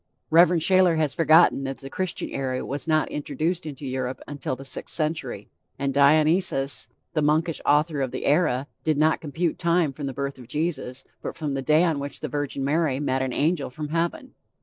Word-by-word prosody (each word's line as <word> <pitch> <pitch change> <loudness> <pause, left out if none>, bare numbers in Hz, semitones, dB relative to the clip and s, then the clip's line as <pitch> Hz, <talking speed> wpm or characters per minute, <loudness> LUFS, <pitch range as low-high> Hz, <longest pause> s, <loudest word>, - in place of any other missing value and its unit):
Rev. 165 +1 +7
Shayler 185 0 +4
has 155 -3 0
forgotten 165 -3 +5
that 135 0 -4
the 135 - -10
Christian 185 +5 -3
era 130 -2 -2
was 140 +2 -5
not 155 -1 +2
introduced 155 +4 -2
into 145 -1 -7
Europe 130 0 -3
until 140 -2 -4
the 135 +2 -11
sixth 135 - -4
century, 150 -9 -3 0.3
and 135 0 -1
Dionysius, 145 - +3 0.3
the 155 - +1
monkish 155 +2 +1
author 150 0 +2
of 130 - 0
the - - -5
era, 145 -4 +2 0.2
did 155 -2 +1
not 155 +2 +2
compute 160 +2 -2
time 170 -4 +2
from 140 0 -5
the 135 - -4
birth 140 0 -4
of 125 - -12
Jesus, 135 -3 -3 0.2
but - - -5
from 150 -2 -3
the 135 - -2
day 155 +4 +4
on 160 -5 +1
which 140 0 -5
the 155 - -2
Virgin 140 0 -2
Mary 145 -2 +1
met 130 -2 0
an 130 -1 -1
angel 150 +2 0
from 150 +4 -6
heaven. 170 - -2
150 Hz, 195 wpm, -25 LUFS, 135-160 Hz, 0.3 s, Rev